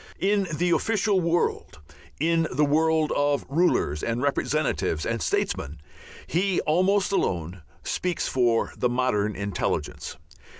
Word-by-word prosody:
In 200 0 +1
the 175 +3 0
official 205 0 +2
world, 170 - -1 0.4
in 165 +1 +2
the 150 +3 +2
world 160 +1 +2
of 145 0 +1
rulers 140 - +1
and 115 +1 -2
representatives 135 - 0
and - - -2
"statesmen," 75 +4 -2 0.5
he 185 +2 0
almost 185 +5 +2
alone, 90 - -1 0.2
speaks 180 -2 -2
for 120 -3 +1
the 125 - 0
modern 115 -5 0
intelligence. 100 0 -3
150 Hz, 120 wpm, -25 LUFS, 115-175 Hz, 0.5 s, official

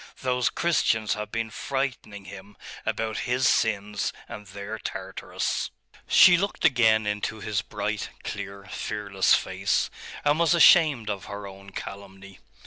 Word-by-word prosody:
Those 125 -3 +1
Christians 110 -10 +1
have 105 0 -5
been 115 -1 -3
frightening 130 -8 -4
him 100 +1 -11 0.3
about 110 -1 -1
his 130 +1 +2
sins 105 -2 +1 0.2
and 105 -1 -9
their 100 +3 -7
Tartarus.' - - -3 0.4
She 175 -1 +7
looked 200 -1 -2
again 110 -7 +4
into 105 +1 -2
his 100 -1 -1
bright, - - -3
clear, 100 0 -6
fearless 100 -3 +1
face, - - 0 0.3
and 145 +2 +3
was 170 0 +4
ashamed 150 - +6
of 100 -3 -5
her 100 0 -7
own 100 0 -11
calumny. 100 0 -9
105 Hz, 135 wpm, -26 LUFS, 100-125 Hz, 0.4 s, She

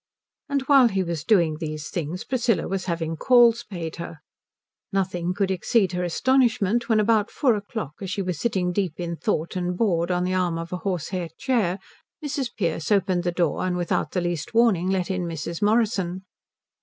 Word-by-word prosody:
And 280 -1 0
while 270 -2 +6
he 195 -4 0
was 170 -4 -4
doing 170 -7 +3
these 155 -2 -5
things 175 +1 -3
Priscilla 235 -8 0
was 190 0 -3
having 165 -2 -2
calls 240 +3 +5
paid 170 -5 -6
her. 170 -1 -7 0.7
Nothing 180 -2 -1
could 190 +1 0
exceed 190 +1 +1
her 180 0 -2
astonishment 235 +2 +2
when 220 -2 +4
about 215 0 +2
four 260 -5 +2
o'clock, 205 -6 -5
as 190 - -4
she 195 +1 -2
was 180 -5 -3
sitting 190 -6 0
deep 180 -4 -2
in 170 -1 -3
thought 170 -3 -2
and 180 -1 -2
bored 175 -6 +1
on 180 0 +1
the 185 +1 -1
arm 180 -3 0
of 165 +2 -6
a - - -1
horsehair 180 -1 -3
chair, 220 -9 +1 0.5
Mrs. 275 -3 -2
Pearce 165 -2 -1
opened 190 -3 +2
the 175 - 0
door 170 -3 0
and 180 -1 -1
without 175 -1 -1
the 180 - 0
least 175 +4 -3
warning 210 -7 +3
let 190 -1 0
in 185 -2 -2
Mrs. 165 0 -5
Morrison. 205 -4 +1
185 Hz, 185 wpm, -24 LUFS, 170-215 Hz, 0.7 s, while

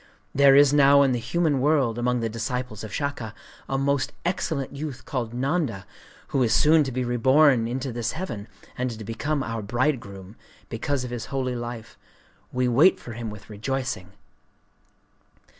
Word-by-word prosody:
There 140 -1 +6
is 145 0 +6
now 140 -1 +6
in 135 - +2
the 120 - 0
human 155 +1 0
world, 135 -6 +2
among 125 0 0
the 115 - 0
disciples 115 0 -4
of 110 - -7
Shaka, 130 -5 -3 0.3
a 135 - 0
most 140 0 0
excellent 155 -6 -2
youth 145 -2 -6
called 120 -4 -3
Nanda, 130 - -1 0.4
who 135 - 0
is 120 -3 +3
soon 155 +1 +5
to 135 - -3
be 130 +1 -2
reborn 130 +1 +4
into 130 +2 -3
this 115 -1 -2
heaven, 115 - -5 0.3
and 125 0 -1
to 110 -2 -7
become 140 +7 -2
our 115 -2 -4
bridegroom, 110 -4 -2 0.3
because 130 +3 -2
of 125 - -6
his 120 -2 -4
holy 130 -2 -2
life. 120 -1 -7 0.5
We 125 0 0
wait 140 +10 +5
for 120 - -9
him 115 -1 -5
with 105 -1 -10
rejoicing. 110 -3 -4
125 Hz, 165 wpm, -25 LUFS, 115-140 Hz, 0.5 s, There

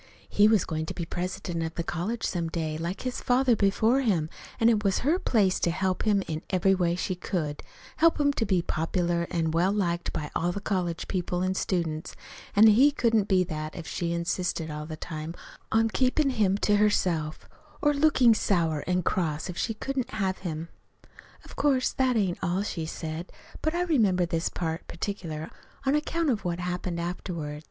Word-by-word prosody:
He 205 +1 +4
was 215 -4 +3
going 160 0 -3
to - - -5
be 170 - -3
president 175 -1 -3
of 160 0 -4
the 170 - -2
college 185 +8 -3
some 170 -2 -1
day, 160 -2 -3
like 170 +5 -4
his 255 -1 -3
father 250 -1 +3
before 220 +6 +3
him; 175 - +1 0.3
an' 225 - +4
it 220 -2 +3
was 200 +4 +1
her 330 +6 +3
place 200 - +2
to - - +1
help 185 +4 -1
him 200 -2 +3
in 155 -1 -3
every 190 +1 +3
way 175 -2 +1
she 185 +1 -2
could 170 -5 -3 0.4
help 330 -1 +4
him 285 -1 +3
to 230 - 0
be 185 -3 +2
popular 170 +1 0
an' 165 -2 0
well 170 +4 +2
liked 175 -4 -1
by 150 -1 -4
all 175 +1 +1
the 200 - -4
college 180 -5 -2
people 180 -1 -1
an' 185 0 +1
students; 170 -4 -2 0.4
an' 210 +2 +8
he 230 +7 +7
couldn't 225 -7 +2
be 185 -2 +4
that 155 -3 -5
if 170 - -7
she 170 0 -2
insisted 170 -1 -1
all 150 0 -5
the 155 -1 -6
time 160 0 -6 0.4
on 225 0 +4
keepin' 265 +5 +2
him 205 -5 +2
to 205 0 +2
herself, 175 -7 +1 0.3
or 295 -4 +3
lookin' 280 -5 +5
sour 165 -8 +1
an' 180 0 +1
cross 165 -1 -1
if - - -10
she 225 - -1
couldn't 260 +2 -3
have 190 -3 -1
him. 165 -2 -5 0.8
"Of - - -12
course 270 -3 +2
that 255 -2 +2
ain't 190 -5 0
all 185 +2 0
she 165 -6 -4
said; 160 +2 -5 0.3
but 315 +2 0
I 350 - +1
remember 210 - +3
this 165 0 -1
part 165 -1 -4
particular 165 -5 -5 0.3
on 270 - +3
account 305 +1 +1
of 220 -3 -2
what 175 -1 -1
happened 180 -1 -3
afterward. 170 -3 -4
185 Hz, 195 wpm, -27 LUFS, 170-220 Hz, 0.8 s, an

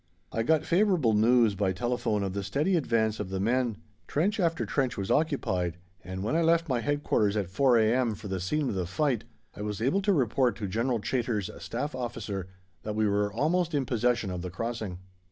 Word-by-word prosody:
I 115 - -1
got 160 +6 +2
favourable 175 - +3
news 115 0 +4
by 95 -1 0
telephone 110 0 -1
of 95 -1 -2
the 100 - -2
steady 145 - 0
advance 115 -8 +1
of 105 -3 -4
the 95 0 -3
men; 120 +1 +1 0.3
trench 200 +9 0
after 165 -3 +1
trench 130 -4 -1
was 100 -1 -2
occupied, 95 - 0 0.3
and 95 +1 -5
when 110 +8 0
I 165 - +3
left 165 0 +3
my 130 -4 +1
Headquarters 130 -8 +1
at 95 -4 -2
4 125 +4 +4
a.m. 115 +1 +2
for 105 +1 -9
the 95 -1 -2
scene 140 +11 -1
of - - -2
the 90 -3 -2
fight, 135 - 0 0.3
I - - -7
was 105 -1 -3
able 135 - +1
to 200 - +2
report 125 - +2
to 105 - -4
General 115 +5 0
Chaytor's 110 -3 -1
Staff 145 +6 -3
Officer 115 -7 -4 0.3
that 105 -1 -4
we 110 0 +2
were 105 0 +1
almost 160 - +1
in 140 -2 +1
possession 120 -4 0
of 90 -1 -4
the 90 - -4
crossing. 110 -1 -4
115 Hz, 205 wpm, -28 LUFS, 100-140 Hz, 0.3 s, news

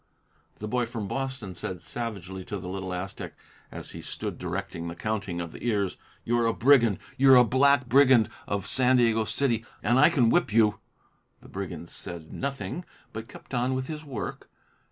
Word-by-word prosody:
The 105 - -5
boy 120 +1 0
from 115 -3 -5
Boston 130 -6 -4
said 90 0 -6
savagely 95 -6 -5
to 105 - -4
the 90 -1 -7
little 95 0 -4
Aztec, 90 +1 -5 0.4
as - - -8
he - - -8
stood - - -5
directing 90 -1 -4
the 85 - -5
counting 100 -2 -3
of 85 -2 -4
the - - -11
ears, 100 -6 0 0.3
"You're 120 0 +2
a 115 - +1
brigand! 120 -6 +5 0.2
You're 135 -1 +8
the 125 - +8
black 130 +2 +3
brigand 130 -3 +6 0.2
of 100 -1 -2
San 130 +2 +3
Diego 115 -2 +3
City, 120 -4 0 0.2
and 120 +2 +3
I 150 - +7
can 125 -9 +3
whip 175 -9 +2
you!" 105 -1 +3 0.6
The - - -14
brigand 90 -3 -6
said 85 -3 -7
nothing, 140 +4 -4 0.3
but 110 +1 -6
kept - - -13
on 125 +1 +1
with 130 0 -2
his 155 +2 -6
work. 120 - -6
115 Hz, 180 wpm, -27 LUFS, 95-130 Hz, 0.6 s, You're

